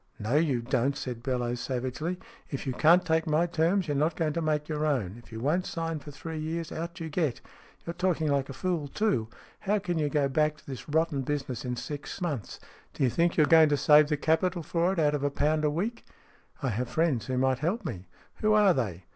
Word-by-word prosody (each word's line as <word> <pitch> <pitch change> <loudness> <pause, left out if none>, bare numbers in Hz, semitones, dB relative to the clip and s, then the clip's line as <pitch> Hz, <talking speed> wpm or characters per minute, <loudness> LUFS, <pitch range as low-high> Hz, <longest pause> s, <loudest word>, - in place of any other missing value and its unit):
" - - -34
No, - - +1
you 145 -6 +2
don't," 130 +3 0
said 120 -3 -5
Bellowes, 125 -1 -1
savagely 130 +8 -3 0.3
"If 140 - -5
you 130 - -1
can't 170 +7 +5
take 160 -1 +1
my 155 +2 +3
terms, 175 +2 +1
you're 145 - -1
not 155 +4 +1
going 155 -3 0
to 170 - -1
make 150 -1 0
your 155 -1 -2
own. 125 -11 0
If - - -19
you 110 - -6
won't 155 +9 0
sign 165 -1 -3
for 145 - -11
three 155 +2 -6
years, 160 +1 -3
out 170 +1 -5
you 165 - -4
get! 155 -5 -1 0.5
You're 170 - -4
talking 175 -3 0
like 140 -1 +1
a - - -5
fool, 175 -2 -2
too. 140 - 0 0.3
How 205 +2 +1
can 175 -5 -2
you 150 -1 +1
go 145 -2 +2
back 150 +2 +1
to 155 - -21
this 135 +2 -8
rotten 160 -2 +1
business 135 -3 -3
in 125 -1 -2
six 145 +3 -6
SMEATH - - -14
9 - - -1
months? 115 -10 -6 0.4
D'you 130 -4 +1
think 170 +5 +1
you're 155 - +6
going 160 0 +6
to 145 - +2
save 150 +1 +6
the 150 - +1
capital 170 +3 +1
for 170 +4 +1
it 195 - -3
out 150 -2 +3
of 145 -1 -1
a 145 - +2
pound 155 +2 +1
a 150 - +3
week? 200 +10 -3 0.2
" - - -30
" - - -24
I 135 - +1
have 120 +2 -2
friends 160 -8 0
who 130 -1 -1
might 130 0 +2
help 180 +11 -1
me." 90 0 -5 0.3
"Who 215 0 +2
are 205 -3 +5
they?" 95 - -3
150 Hz, 245 wpm, -28 LUFS, 135-165 Hz, 0.5 s, you're